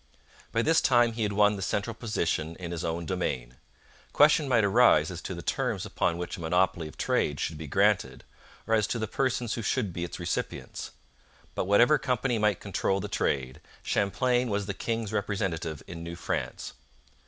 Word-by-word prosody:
By 115 - +1
this 160 +4 +4
time 120 -3 +4
he 115 - -5
had 105 -1 0
won 105 0 +4
the - - -6
central 100 +4 -1
position 85 -8 -2
in 85 -1 -7
his 85 -2 -4
own 85 +1 -2
domain. 65 -9 -3 0.6
Question 150 0 +5
might 120 -4 +3
arise 115 +5 +5
as - - -6
to - - -5
the - - -7
terms - - -1
upon 85 - 0
which 90 0 -5
a - - -8
monopoly 85 0 +1
of 75 - -13
trade 75 -2 0
should 80 - -2
be 75 0 -7
granted, 100 +5 +1 0.4
or 115 - -1
as 110 -2 +3
to 120 - -2
the 110 - -1
persons 125 -1 -1
who 115 - -3
should 110 -3 -1
be 85 - -3
its 85 - -6
recipients. 85 -1 -4 0.6
But - - -2
whatever 120 +9 +5
company 125 -2 0
might 105 -3 +2
control 95 -1 -1
the 105 - -4
trade, 65 -7 -1 0.2
Champlain 125 +4 +1
was 100 -1 -1
the 100 - -3
king's 115 +1 -3
representative 95 -7 -2
in 85 -1 -8
New 85 0 -6
France. - - -4
100 Hz, 190 wpm, -28 LUFS, 85-115 Hz, 0.6 s, Question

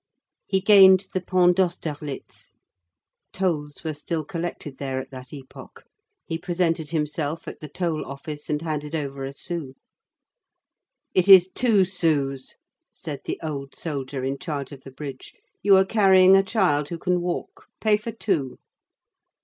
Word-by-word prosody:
He 190 -1 +1
gained 190 -1 +7
the 185 - -1
Pont 180 0 +3
d'Austerlitz. 155 -6 -4 0.8
Tolls 155 -6 -2
were 160 -1 -2
still 155 +1 -4
collected 165 -4 -5
there 135 -2 -3
at 130 - -8
that 130 -1 -10
epoch. 135 -3 -12 0.4
He 165 -2 -4
presented 170 -3 -1
himself 150 0 -3
at - - -7
the 155 - -8
toll 165 0 -2
office 145 +2 -7
and 150 +1 -1
handed 150 -1 -3
over 140 -3 -4
a 135 - -5
sou. 140 -1 -4 1.4
"It 185 +1 +2
is 190 -1 +9
two 215 -5 +3
sous," 150 -7 -1 0.4
said - - -7
the - - -4
old 140 -3 -5
soldier 140 -4 -5
in 135 +1 -2
charge 145 -4 -5
of 140 -2 -10
the 135 - -12
bridge. 135 -1 -9 0.3
"You 200 -1 +6
are 190 - +4
carrying 190 -3 +6
a 195 - +6
child 185 -9 +1
who 170 - -4
can 180 +1 0
walk. 175 0 -5
Pay 215 -1 +3
for 220 +2 -6
two." 175 - -2
160 Hz, 150 wpm, -24 LUFS, 145-185 Hz, 1.4 s, is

